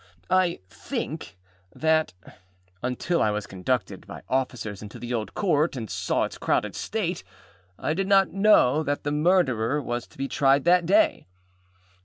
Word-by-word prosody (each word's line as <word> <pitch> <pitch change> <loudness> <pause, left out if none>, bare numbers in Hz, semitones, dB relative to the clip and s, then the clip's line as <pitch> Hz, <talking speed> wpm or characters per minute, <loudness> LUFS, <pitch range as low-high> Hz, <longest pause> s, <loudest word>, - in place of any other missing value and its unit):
I 185 - +2
think 90 - -6 0.4
that, 160 - +2 0.7
until 125 +8 -1
I 110 - +3
was 105 0 -2
conducted 100 +4 -3
by - - -9
officers 125 -6 -2
into 105 0 -9
the 120 0 -5
Old 110 -2 -3
Court 160 -6 +1
and 115 -5 -6
saw - - 0
its - - -5
crowded - - 0
state, 190 -5 -3 0.5
I 155 - -1
did 190 +3 -1
not 195 -1 +4
know 195 -8 +4
that 145 -2 -2
the 145 - -1
Murderer 150 -6 +2
was 120 -3 -4
to - - -22
be 135 - -2
tried 135 0 +3
that 175 0 +4
day. 315 - +3
145 Hz, 155 wpm, -25 LUFS, 120-175 Hz, 0.7 s, not